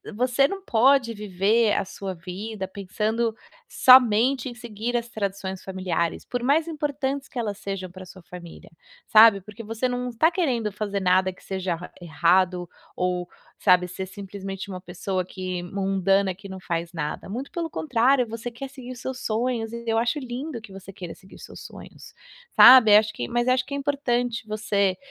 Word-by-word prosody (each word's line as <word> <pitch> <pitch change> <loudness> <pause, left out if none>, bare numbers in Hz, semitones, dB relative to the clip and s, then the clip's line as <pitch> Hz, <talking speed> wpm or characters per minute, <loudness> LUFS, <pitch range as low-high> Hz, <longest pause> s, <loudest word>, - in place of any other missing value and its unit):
você 250 +3 +2
não 390 +4 -6
pode 245 0 +3
viver 210 +2 +1
a - - 0
sua 190 -1 -6
vida 190 +4 -6
pensando 215 +4 -2 0.3
somente 255 +1 +5
em 240 - -10
seguir 235 0 -3
as 235 0 -4
tradições 195 -4 -4
familiares, 185 -3 -2
por 245 - -3
mais 295 +6 +2
importantes 280 -3 -3
que 255 - -11
elas 210 -4 -3
sejam 190 -2 -5
pra 185 0 -11
sua 185 0 -14
família, 175 -1 -12 0.3
sabe, 215 -2 +7
porque 210 +4 -11
você 225 +3 -2
não 250 0 -3
está 315 +9 +2
querendo 250 - 0
fazer 205 -1 -3
nada 185 0 +2
que 185 - -19
seja 190 -2 -2
ra 175 +2 -10
errado, 175 +1 +2 0.3
ou, 180 -1 -2 0.3
sabe, 180 0 +4
ser 190 +1 -6
simplesmente 195 0 -7
uma 185 -2 -6
pessoa 185 +1 -3
que 185 -1 -5
mundana, 195 +1 0
que 195 +2 -12
não 190 0 -7
faz 170 -1 -3
nada, 155 0 -5
muito 250 +7 -5
pelo 335 -2 -3
contrário, 255 -3 +2
você 230 +2 -5
quer 240 +4 -8
seguir 255 -2 -9
os 240 - -12
seus 260 0 -5
sonhos, 225 0 -1
e 235 0 -7
eu 225 0 +2
acho 240 +6 0
lindo 255 0 -5
que 215 -3 -13
você 195 0 -10
queira 180 -3 -8
seguir 190 - -17
os - - -13
seus - - -11
sonhos, - - -13 0.4
sabe. 225 -5 +9
Acho 215 0 +1
que 120 - -4
mas 240 0 -1
acho 255 0 +3
que 280 - -6
é - - -2
importante 245 -5 -1
você 200 -3 0
215 Hz, 180 wpm, -24 LUFS, 190-245 Hz, 0.4 s, sabe